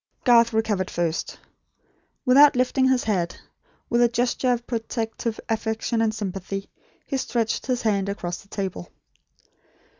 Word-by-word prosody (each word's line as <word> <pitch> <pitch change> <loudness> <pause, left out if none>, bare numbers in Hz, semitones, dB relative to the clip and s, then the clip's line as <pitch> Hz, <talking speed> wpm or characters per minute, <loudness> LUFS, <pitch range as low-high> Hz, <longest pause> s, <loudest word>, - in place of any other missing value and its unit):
Garth 235 -2 +5
recovered 215 -4 0
first. 170 -1 -2 0.9
Without 280 +3 +7
lifting 255 +1 +2
his 260 -2 +2
head, 180 -5 -1 0.5
with 240 - +2
a 240 - +6
gesture 245 +1 +1
of 240 -1 -1
protective 225 -1 -3
affection 225 +1 -1
and 225 -1 +2
sympathy, 195 -2 -5 0.3
he 275 - -2
stretched 235 -3 -1
his 250 -2 -1
hand 200 -3 +1
across 180 -3 -4
the - - -21
table. 190 - -5
225 Hz, 130 wpm, -24 LUFS, 200-245 Hz, 0.9 s, Without